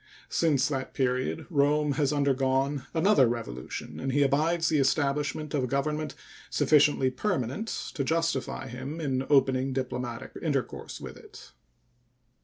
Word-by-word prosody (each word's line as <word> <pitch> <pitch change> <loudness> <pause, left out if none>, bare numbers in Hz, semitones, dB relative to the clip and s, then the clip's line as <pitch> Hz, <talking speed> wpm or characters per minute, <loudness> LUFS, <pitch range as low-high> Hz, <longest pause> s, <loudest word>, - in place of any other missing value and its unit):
Since 145 -6 +2
that 135 -3 -4
period 130 +4 0
Rome 150 0 +3
has 145 0 +1
undergone 135 -1 +1
another 160 - +4
revolution, 115 - -5
and 135 +1 -2
he 145 +2 +3
abides 160 +5 +2
the 155 -2 +2
establishment 145 +2 0
of 140 -3 +1
a - - 0
government 150 +3 -1 0.3
sufficiently 145 -3 +3
permanent 155 - -2 0.3
to 140 - -1
justify 160 -4 -1
him 130 +6 -6
in 135 -4 -1
opening 135 -2 +3
diplomatic 125 -2 -4
intercourse - - -3
with - - -8
it. - - -14
140 Hz, 130 wpm, -28 LUFS, 130-150 Hz, 0.3 s, another